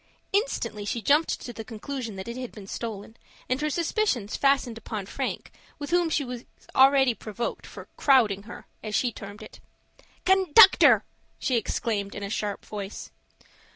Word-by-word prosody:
Instantly 405 - -1
she 205 +3 -2
jumped 290 +9 +2
to 240 - -7
the 225 - -7
conclusion 230 0 -6
that 190 +3 -7
it 235 - -5
had 255 -1 -6
been 205 -3 -11
stolen, 220 +1 -6 0.3
and 255 +3 -1
her 305 - 0
suspicions 325 - 0
fastened 275 -4 +2
upon 215 -3 -5
Frank, - - -4 0.3
with 290 +1 -6
whom 350 -1 +3
she 295 -3 0
was 245 -1 -6 0.3
already 265 -1 +5
provoked 225 +1 -5
for - - -11
"crowding 230 -8 +4
her," - - -10 0.2
as 215 -1 -4
she 245 +4 +1
termed 200 -1 -10
it. - - -13 0.7
"Conductor!" 380 +1 +7 0.3
she 255 - 0
exclaimed 210 -2 -2
in 205 - -5
a 200 - -4
sharp 205 -2 -3
voice. 205 -1 -7
235 Hz, 160 wpm, -26 LUFS, 210-280 Hz, 0.7 s, Conductor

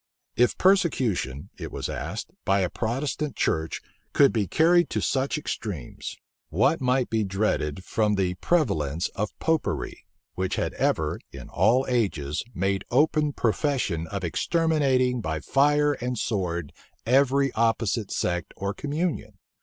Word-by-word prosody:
If 125 0 +3
persecution, 130 - +1
it - - -6
was - - -4
asked, - - -5
by 95 0 +2
a 90 - 0
Protestant 135 +5 -2
church 80 0 -1 0.3
could 140 - +5
be 105 -4 0
carried 170 - +4
to - - -1
such 135 +3 0
extremes, 100 - -5 0.3
what 115 - +2
might 125 0 +1
be 110 -1 +1
dreaded 95 -5 -1
from 105 +1 +1
the 95 -2 0
prevalence 90 - 0
of 105 +1 -4
Popery, 160 -1 -1 0.3
which 95 0 -2
had - - -1
ever, - - 0
in - - -10
all 115 +9 +3
ages, 90 - 0
made 95 +1 0
open 150 +3 +3
profession 115 - 0
of 100 +3 -5
exterminating 130 - +1
by 80 -5 -2
fire 145 - +3
and 125 -2 -3
sword 85 -8 -2 0.3
every 135 +2 +3
opposite 115 -2 +1
sect 90 -1 -2
or 100 +1 -2
communion? 145 - -3
115 Hz, 135 wpm, -26 LUFS, 95-140 Hz, 0.3 s, could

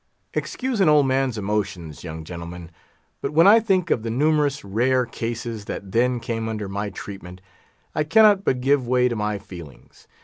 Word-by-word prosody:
"Excuse 255 -5 -2
an 180 - +5
old 150 -2 +5
man's 130 -2 0
emotions, 100 -6 -3
young 80 -2 -7
gentlemen; 85 0 -8 0.5
but 140 - -3
when 165 +3 +5
I 215 +3 +8
think 190 -6 0
of 115 - +2
the 115 - -4
numerous 145 +1 +1
rare 125 +6 +1
cases 115 -2 -5
that 100 -2 -6
then 125 +3 +2
came 115 -1 -3
under 105 -2 -4
my 100 +2 -3
treatment, 95 -1 -9 0.5
I 155 - 0
cannot 205 +3 +5
but 125 -7 0
give 135 -1 +2
way 125 0 +3
to 120 - -3
my 105 -1 -1
feelings. 85 -7 -13
115 Hz, 175 wpm, -23 LUFS, 100-145 Hz, 0.5 s, I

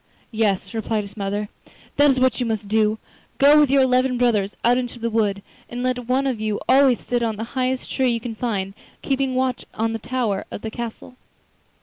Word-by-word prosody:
'Yes,' 200 -4 0
replied 220 -1 -1
his 200 0 -11
mother, 205 0 -3 0.5
'that 290 0 +5
is 260 -1 +2
what 255 -2 +2
you 250 - 0
must 215 -2 -2
do—go 220 +7 +2
with 295 -3 +4
your 275 0 +4
eleven 255 0 +2
brothers 215 -5 +1
out 240 +1 +4
into 245 -1 -5
the 230 0 -3
wood, 205 -3 0 0.3
and 245 +1 -5
let 250 -2 -2
one 260 +2 +1
of 255 -5 -1
you 215 -1 -1
always 265 -2 +5
sit 245 -1 -2
on 225 -2 0
the 215 - -5
highest 255 0 -1
tree 260 -1 +1
you 235 -1 0
can 230 0 -5
find, 205 -4 -3 0.3
keeping 270 -1 0
watch 255 -1 0
on 225 +1 -1
the 225 - -3
tower 225 -5 -2
of - - -7
the 220 - -4
castle. 240 +2 -7
235 Hz, 205 wpm, -22 LUFS, 215-255 Hz, 0.5 s, that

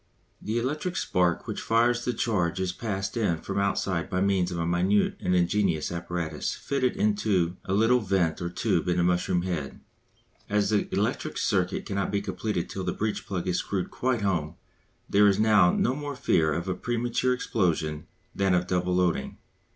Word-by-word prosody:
The 110 +2 -2
electric 150 +9 -2
spark 90 -1 +1
which - - -4
fires 120 +2 +2
the 125 - -1
charge 95 -7 0
is 95 -1 0
passed 95 -1 -4
in 105 -8 +1
from 90 - -3
outside 95 -3 0
by 90 - -1
means 95 -2 +2
of 90 - -4
a 85 - -1
minute 90 +4 +2
and 90 0 0
ingenious 90 -3 +1
apparatus 85 -3 -3
fitted 130 -3 -1
into 100 -4 +1
a 95 - -2
little 115 +4 +4
vent 95 -6 0
or 85 - -2
tube 90 - 0
in 90 0 +1
the 90 - +3
mushroom 90 0 +1
head. 85 -7 -4 0.7
As 105 0 +1
the 105 - 0
electric - - -1
circuit - - 0
cannot 100 0 -2
be 100 - 0
completed 100 -2 -3
till 95 - -5
the 90 -1 -1
breech 105 0 -3
plug 95 -2 -3
is 90 -1 +1
screwed 95 0 -3
quite 125 -3 0
home 85 -5 -1 0.5
there 105 +1 +5
is 100 0 +3
now 105 -5 +5
no 125 - +1
more 145 0 -5
fear 80 - +2
of 85 +5 -2
a 95 - 0
premature 120 +4 0
explosion 85 -9 -1 0.3
than 95 -2 +2
of 90 0 +1
double 90 0 0
loading. 90 -6 0
95 Hz, 180 wpm, -27 LUFS, 90-110 Hz, 0.7 s, there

